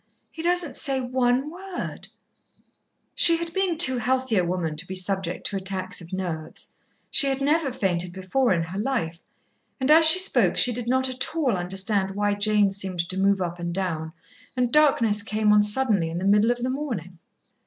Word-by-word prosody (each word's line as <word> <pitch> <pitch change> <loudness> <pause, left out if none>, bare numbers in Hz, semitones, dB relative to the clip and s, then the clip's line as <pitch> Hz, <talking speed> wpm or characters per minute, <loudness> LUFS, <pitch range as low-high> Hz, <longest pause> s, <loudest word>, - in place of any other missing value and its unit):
He 320 - -8
doesn't 345 -4 0
say 270 -1 +1
one 255 +2 0
word 370 +1 -7 0.6
" - - -44 0.3
She 340 -10 +5
had 335 0 -6
been 385 -4 0
too 260 -6 +3
healthy 255 0 0
a 185 - +2
woman 170 -3 -2
to 170 +3 -4
be 190 - -6
subject 185 -1 -2
to 200 - -1
attacks 190 -1 -3
of 170 +1 -13
nerves. 175 -4 -5 0.4
She 280 - +4
had 270 0 -1
never 290 0 +1
fainted 180 -6 -1
before 190 +8 -1
in 170 -3 +1
her 180 +4 -6
life, 180 -9 -2 0.6
and 260 +2 +1
as 320 +1 +7
she 320 +3 +7
spoke 370 +1 +2
she 245 - +3
did 235 0 -5
not 260 +1 +1
at 260 +4 -2
all 275 -9 +1
understand 190 +2 -1
why 205 0 0
Jane 205 -1 +1
seemed 190 -3 -2
to 185 - -4
move 195 -1 +2
up 175 0 -5
and 170 0 -4
down, 160 -4 -3 0.4
and 245 -1 0
darkness 235 -9 +3
came 215 0 +1
on 210 - +5
suddenly 210 -5 +1
in 165 - -5
the 185 - -3
middle 210 +3 +3
of 245 0 -1
the 255 - -1
morning. 220 - -5
210 Hz, 195 wpm, -24 LUFS, 185-265 Hz, 0.6 s, as